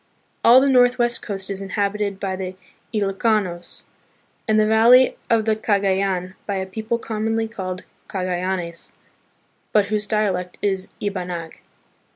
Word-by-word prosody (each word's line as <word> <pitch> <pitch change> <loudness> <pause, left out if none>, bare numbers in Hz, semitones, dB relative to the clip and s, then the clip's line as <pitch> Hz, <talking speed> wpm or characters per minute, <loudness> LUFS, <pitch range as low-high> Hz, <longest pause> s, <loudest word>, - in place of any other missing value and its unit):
All 240 +2 +8
the 275 - +2
northwest 245 -2 +3
coast 195 -2 -4
is 195 0 -3
inhabited 200 0 -2
by 190 -1 -2
the 185 0 -5 0.4
Ilokanos, 200 -3 -1 0.6
and 215 0 +3
the 215 - +4
valley 235 +4 +6
of 225 -2 +3
the 220 -1 +2
Cagayan 195 -3 0
by 200 - -1
a 190 0 -2
people 220 +4 -3
commonly 225 0 -2
called 185 -5 -5 0.3
Caga 185 -2 -2
yanes, 180 -3 -4 0.8
but 205 -2 +3
whose 210 -1 -1
dialect 190 -5 -1
is 190 -2 -1
Ibanag. 180 -5 -4
200 Hz, 135 wpm, -22 LUFS, 190-220 Hz, 0.8 s, All